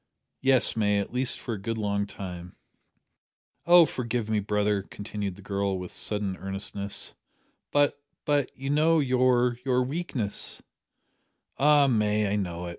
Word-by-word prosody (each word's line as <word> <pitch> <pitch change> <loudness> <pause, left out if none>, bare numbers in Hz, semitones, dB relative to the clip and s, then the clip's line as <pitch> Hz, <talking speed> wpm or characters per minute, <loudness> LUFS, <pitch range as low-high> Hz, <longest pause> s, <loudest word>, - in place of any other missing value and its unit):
"Yes, 135 -1 +4
May 105 -2 +2
at 100 - -4
least 125 0 +1
for 120 - -4
a 100 - -6
good 115 +3 -3
long 100 -1 -1
time." 90 -3 -8 1.1
"Oh 175 -1 +8
forgive 120 -5 -3
me, 110 - +2
brother," 105 0 0
continued 100 -1 -6
the 100 - -14
girl, 100 -1 -1
with 90 -1 -7
sudden 105 -3 -2
earnestness, 100 +1 -3 0.6
"but 145 0 +2 0.2
but 145 -3 +1
you 135 +2 -3
know 160 +3 +4
your 125 -3 +2
your 125 -1 +2
weakness 130 -7 -2 0.5
" - - -42
"Ay, 145 0 +5
May, 105 -4 +2
I - - +2
know 90 -3 -3
it. - - -5
105 Hz, 150 wpm, -27 LUFS, 100-130 Hz, 1.1 s, Oh